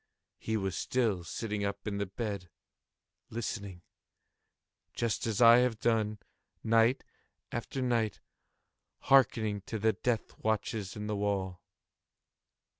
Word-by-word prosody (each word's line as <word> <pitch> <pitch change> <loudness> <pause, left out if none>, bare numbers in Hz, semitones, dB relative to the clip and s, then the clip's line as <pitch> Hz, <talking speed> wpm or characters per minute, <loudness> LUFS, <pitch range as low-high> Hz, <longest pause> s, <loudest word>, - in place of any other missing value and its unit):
He 110 0 -1
was 95 -2 -2
still 110 -8 0
sitting 105 +4 -3
up 100 0 -3
in 100 -2 -2
the 100 - -1
bed 100 -3 -4 0.8
listening;—just 105 +2 -6
as 115 +1 +2
I 115 +1 +9
have 125 -3 +1
done, 110 -2 +1 0.5
night 115 +3 +3 0.5
after 130 +3 -3
night, 115 -4 0 0.8
hearkening 115 -6 +3
to 110 - -3
the 110 +1 +2
death 120 -3 -2
watches 110 -2 -1
in 105 -1 -5
the 105 0 -2
wall. 95 -3 -1
110 Hz, 115 wpm, -31 LUFS, 100-115 Hz, 0.8 s, I